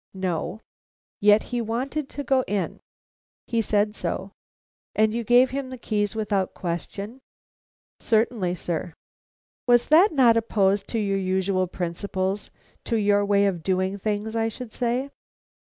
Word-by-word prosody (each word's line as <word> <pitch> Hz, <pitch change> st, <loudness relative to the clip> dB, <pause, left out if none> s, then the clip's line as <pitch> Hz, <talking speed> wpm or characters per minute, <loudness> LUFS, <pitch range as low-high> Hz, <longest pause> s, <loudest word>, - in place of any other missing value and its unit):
"No." 185 Hz, +2 st, -3 dB, 0.6 s
"Yet 210 Hz, +1 st, +5 dB
he 240 Hz, -, +1 dB
wanted 260 Hz, +6 st, -3 dB
to 285 Hz, -, -5 dB
go 265 Hz, -2 st, +2 dB
in?" 200 Hz, -1 st, -2 dB, 0.7 s
"He 230 Hz, -1 st, 0 dB
said 210 Hz, 0 st, +1 dB
so." 195 Hz, -2 st, -3 dB, 0.6 s
"And 215 Hz, 0 st, +3 dB
you 235 Hz, 0 st, -2 dB
gave 245 Hz, +3 st, +5 dB
him 270 Hz, -1 st, -3 dB
the 255 Hz, -, -7 dB
keys 210 Hz, -3 st, -1 dB
without 205 Hz, -3 st, -1 dB
question?" 200 Hz, +7 st, -5 dB, 0.8 s
"Certainly, 220 Hz, -5 st, +1 dB
sir." 170 Hz, 0 st, -4 dB, 0.7 s
"Was 240 Hz, -1 st, +4 dB
that 345 Hz, +7 st, +6 dB
not 250 Hz, -6 st, +5 dB
opposed 200 Hz, -3 st, +1 dB
to 230 Hz, -, -1 dB
your 200 Hz, -2 st, 0 dB
usual 185 Hz, 0 st, 0 dB
principles 185 Hz, +3 st, -3 dB, 0.4 s
to 230 Hz, -, 0 dB
your 205 Hz, -1 st, +3 dB
way 200 Hz, 0 st, +3 dB
of 185 Hz, -4 st, 0 dB
doing 185 Hz, +3 st, 0 dB
things, 215 Hz, +2 st, -2 dB
I 225 Hz, 0 st, +1 dB
should 225 Hz, 0 st, -9 dB
say?" 250 Hz, +3 st, -1 dB
210 Hz, 140 wpm, -25 LUFS, 190-235 Hz, 0.8 s, that